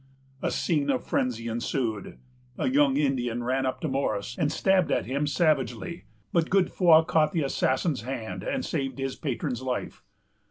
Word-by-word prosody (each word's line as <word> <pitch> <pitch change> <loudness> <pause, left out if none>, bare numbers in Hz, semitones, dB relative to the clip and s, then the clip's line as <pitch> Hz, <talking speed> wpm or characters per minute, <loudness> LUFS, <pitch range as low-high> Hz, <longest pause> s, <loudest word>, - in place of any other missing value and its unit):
A - - 0
scene 145 -4 0
of 130 -2 0
frenzy 115 -2 -1
ensued. 115 -2 -2 0.4
A - - 0
young 135 +1 +3
Indian 125 -5 0
ran 130 +2 0
up 130 - -2
to 160 - -1
Morris, 125 -5 -1
and 150 - 0
stabbed 190 +2 +2
at - - +1
him 140 +3 -1
savagely; 145 - 0 0.3
but 165 -1 +2
Godefroy 180 -3 +5
caught 160 +1 +2
the 165 -4 +1
assassin's 135 +1 0
hand, 110 -7 -5
and - - -2
saved 135 -5 -2
his 135 -1 -3
patron's 125 -4 -3
life. 130 -1 -4
135 Hz, 160 wpm, -27 LUFS, 125-155 Hz, 0.4 s, Godefroy